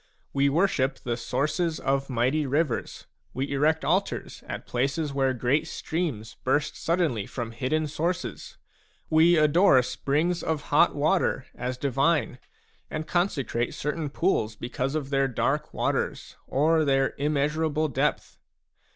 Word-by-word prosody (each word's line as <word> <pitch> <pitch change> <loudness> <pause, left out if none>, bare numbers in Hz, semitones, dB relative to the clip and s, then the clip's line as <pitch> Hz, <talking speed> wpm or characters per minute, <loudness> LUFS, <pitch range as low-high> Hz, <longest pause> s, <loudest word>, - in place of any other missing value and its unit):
We 140 0 +3
worship 140 -4 +1
the 120 -1 -3
sources 155 +7 -1
of 135 0 0
mighty 130 +5 +1
rivers; 150 +4 -1 0.3
we 135 +2 -2
erect 155 +3 +2
altars 185 +5 -1
at - - -6
places 140 +4 -1
where 135 -1 +2
great 135 +6 +1
streams 155 -12 -4
burst 145 +3 +1
suddenly 165 - 0
from 120 -3 -5
hidden 135 +7 -1
sources; 150 - -3 0.5
we 165 +2 +5
adore 155 0 +5
springs 150 +7 0
of 155 -2 -3
hot 150 - +5
water 145 -2 +1
as 125 +1 -4
divine, 135 -1 +1 0.5
and 155 +1 -4
consecrate 140 - -1
certain 150 +1 -3
pools 135 - 0
because 125 +5 -3
of 145 -3 -3
their 135 0 +2
dark 125 - -1
waters - - -2
or 155 +4 +3
their 135 -2 +2
immeasurable 150 +2 +1
depth. 140 - -1
145 Hz, 130 wpm, -26 LUFS, 130-160 Hz, 0.5 s, we